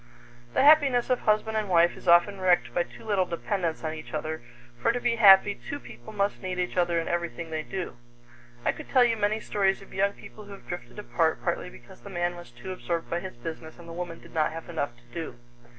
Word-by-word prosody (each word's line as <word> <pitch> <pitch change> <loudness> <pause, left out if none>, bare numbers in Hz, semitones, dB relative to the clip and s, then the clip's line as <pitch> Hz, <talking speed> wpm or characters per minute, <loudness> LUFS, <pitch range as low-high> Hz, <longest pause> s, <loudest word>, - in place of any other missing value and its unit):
The - - +4
happiness 280 -5 +5
of 250 - +3
husband 215 +1 +1
and 215 -2 -1
wife 170 -1 +4
is - - -12
often 175 +3 +5
wrecked 180 -1 +3
by 175 - +2
too 175 - -8
little 200 -4 +1
dependence 170 -1 -2
on 155 -1 -2
each 155 0 -7
other, 155 +1 -3 0.4
for - - +4
to 245 - -2
be 240 -1 +1
happy 200 -2 +8
two 285 +7 -7
people 120 - -12
must 200 -1 -1
need 185 -2 -3
each 180 0 -2
other 175 -2 +2
in 165 - -3
everything 170 -1 -3
they 155 -1 -1
do. 185 -4 -5 0.7
I - - +4
could - - -10
tell 255 -2 +6
you 235 -2 +3
many 215 0 +1
stories 195 -3 +1
of - - -16
young 200 +1 +2
people 210 +1 -12
who 200 - -10
have 195 - -13
drifted 175 +3 -7
apart 165 -6 0
partly - - -1
because 120 - -15
the 200 - -10
man 175 -1 -1
was 175 -4 -11
too 120 +9 -8
absorbed 170 -2 -3
by 170 - +1
his 185 -7 -8
business 160 +4 -7
and 170 -1 -13
the 165 - -8
woman 175 -1 -5
did - - -16
not 155 -1 +2
have 165 0 -7
enough 145 -7 -3
to 120 - -23
do. 160 -7 -5
180 Hz, 235 wpm, -27 LUFS, 165-205 Hz, 0.7 s, happy